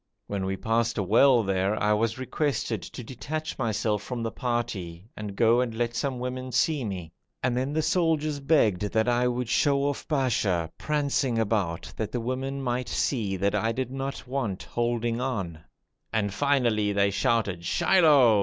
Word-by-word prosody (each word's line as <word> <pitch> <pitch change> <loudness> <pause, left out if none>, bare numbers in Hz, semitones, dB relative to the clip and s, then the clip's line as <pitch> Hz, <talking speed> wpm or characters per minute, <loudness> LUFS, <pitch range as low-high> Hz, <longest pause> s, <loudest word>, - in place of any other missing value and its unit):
When 100 -2 -3
we 95 0 -2
passed 115 +3 0
a 100 - +1
well 120 +5 +5
there 95 +1 0
I 105 +1 +3
was 110 +2 0
requested 130 - -1
to 125 - -8
detach 150 +7 -5
myself 110 -3 0
from 120 +2 -4
the 115 - -2
party 110 -9 -3
and 105 -2 -6
go 115 +3 +4
and 120 -3 -2
let 120 0 -1
some 130 +1 -1
women 130 +1 -4
see 140 +4 +1
me, 90 -6 -5 0.3
and 125 -1 +1
then 130 +3 -1
the 155 +1 0
soldiers 155 -4 +1
begged 135 - +3
that 110 +2 +1
I 120 0 +3
would 125 0 -1
show 140 +3 +2
off 145 0 -2
Basha 105 - +1
prancing 140 -5 0
about 100 -7 -1
that 110 -1 -3
the 125 - -2
women 135 +3 -3
might 125 0 -1
see 105 -8 0
that 100 +2 +1
I 115 - +1
did 130 +1 -3
not 135 0 -5
want 125 -8 -2
holding 120 0 -1
on, 100 -11 -3 0.5
and 100 -2 0
finally 120 -5 +2
they 100 0 +2
shouted 100 -3 0
'Shilloh!' 145 - +5
120 Hz, 175 wpm, -27 LUFS, 105-135 Hz, 0.5 s, well